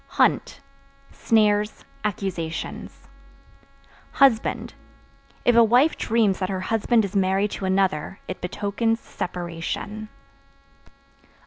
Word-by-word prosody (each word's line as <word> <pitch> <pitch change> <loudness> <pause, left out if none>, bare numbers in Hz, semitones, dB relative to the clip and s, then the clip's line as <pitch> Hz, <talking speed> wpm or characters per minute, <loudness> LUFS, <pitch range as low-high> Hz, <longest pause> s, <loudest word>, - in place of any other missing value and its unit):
Hunt - - +2 0.5
Snares, 210 -1 +1 0.2
accusations. 185 -5 -4 1.1
Husband 265 -5 +2 0.7
If 245 - +4
a 235 - +8
wife 250 +8 +4
dreams 220 -4 +1
that 185 -1 -2
her 190 -1 -2
husband 225 +2 +2
is 195 - -7
married 195 +1 +2
to 195 - -4
another 190 -2 0
it 185 - -6
betokens 210 +5 -1
separation. 180 +5 -5
205 Hz, 95 wpm, -24 LUFS, 185-225 Hz, 1.1 s, a